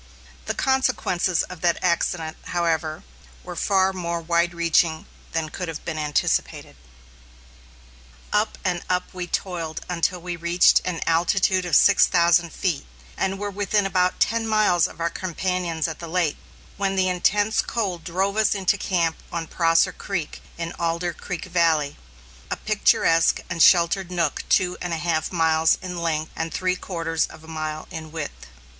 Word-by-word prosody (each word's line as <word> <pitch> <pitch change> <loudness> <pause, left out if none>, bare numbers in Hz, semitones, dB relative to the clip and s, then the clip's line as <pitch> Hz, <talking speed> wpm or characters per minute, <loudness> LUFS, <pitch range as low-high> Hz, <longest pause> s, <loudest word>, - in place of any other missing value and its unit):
The - - -1
consequences 255 -10 +1
of 180 -3 -9
that 170 -1 +2
accident, 170 -2 0
however, 165 -2 -1 0.4
were - - -7
far 190 -1 +2
more 170 -2 -3
wide 170 +1 +1
reaching 165 -1 +1 0.3
than 160 -1 -2
could 180 +2 -5
have 160 -2 -7
been 160 -2 -3
anticipated. 150 -1 -1 1.6
Up 210 +1 +1
and 175 -2 0
up 180 0 -1
we 180 -1 -5
toiled 170 -3 -3
until 180 0 -1
we 175 0 -5
reached 170 +1 +4
an 180 -3 -3
altitude 185 +3 +2
of 170 -4 +1
six 200 +4 +6
thousand 170 0 +3
feet, 170 -5 -2 0.3
and 195 0 -1
were 205 +1 -4
within 205 +1 0
about 185 -1 +1
ten 230 0 +1
miles 215 -6 +3
of - - -14
our 170 0 -1
companions 180 -2 -2
at 160 - -6
the 170 - -7
lake, 165 -3 0 0.4
when 195 0 0
the 190 -1 +2
intense 205 +4 +2
cold 190 -8 -3
drove 190 +4 -1
us 215 -1 +3
into 190 -2 +1
camp 170 -4 0
on 170 -1 -3
Prosser 165 0 +2
Creek 175 -7 -5 0.2
in 165 0 -4
Alder 170 +1 -1
Creek 180 +1 -6
Valley, 165 -5 +1 0.5
a - - -1
picturesque 165 0 +3
and 170 -1 -1
sheltered 175 +2 +5
nook 170 -4 -1
two 180 -1 +2
and 175 -1 -3
a - - -1
half 160 -1 -1
miles 160 -2 +3
in 180 -2 -6
length 160 -2 -1
and 165 0 -3
three 185 0 0
quarters 165 -3 -2
of 160 - -14
a - - -14
mile 155 -1 -5
in 160 -2 -7
width. 155 - -6
170 Hz, 160 wpm, -23 LUFS, 165-185 Hz, 1.6 s, six